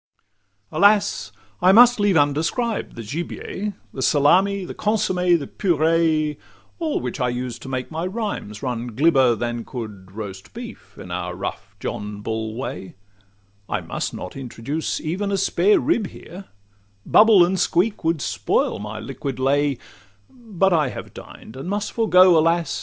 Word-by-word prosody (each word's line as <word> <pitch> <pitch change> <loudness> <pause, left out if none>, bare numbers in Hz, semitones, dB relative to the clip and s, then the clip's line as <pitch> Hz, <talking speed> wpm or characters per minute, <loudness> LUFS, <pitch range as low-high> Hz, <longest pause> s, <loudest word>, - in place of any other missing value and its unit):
Alas! 205 +1 +3 0.3
I 185 +1 +6
must 240 +3 +7
leave 205 -4 +3
undescribed 165 - 0
the 115 - -7
gibier, 175 - -5 0.2
The 130 - -5
salmi, 185 +9 +3
the - - -7
consomme, 180 -5 +1
the 145 - -6
puree, 160 -3 +1 0.4
All 320 -3 -1
which 125 +2 -5
I 125 -1 +1
use 125 0 -4
to 135 - -9
make 130 +1 -4
my 165 +3 -2
rhymes 190 - -5
run 120 -3 -4
glibber 135 -4 +4
Than 120 +1 -3
could 105 -7 -8
roast 100 -3 -8
beef - - -10
in - - -9
our - - -4
rough - - -6
John 105 0 -5
Bull 110 0 -3
way: 120 -6 -6 0.7
I - - -1
must - - -4
not - - -8
introduce 135 +4 -4
even 190 +6 -2
a 195 - +1
spare 195 +1 +3
rib 240 - +1
here, 185 +3 -11 0.6
'Bubble 215 -5 +6
and 185 +1 -1
squeak' 185 +4 +1
would 165 -2 0
spoil - - 0
my 105 +1 -6
liquid 135 +2 -5
lay: 140 +1 +1 0.5
But 200 -7 0
I 155 -4 +3
have - - -8
dined, 110 - -12
and 135 +7 -6
must 205 +1 -2
forego, 185 -5 +5
Alas! 165 +1 +1
160 Hz, 150 wpm, -22 LUFS, 125-195 Hz, 0.7 s, must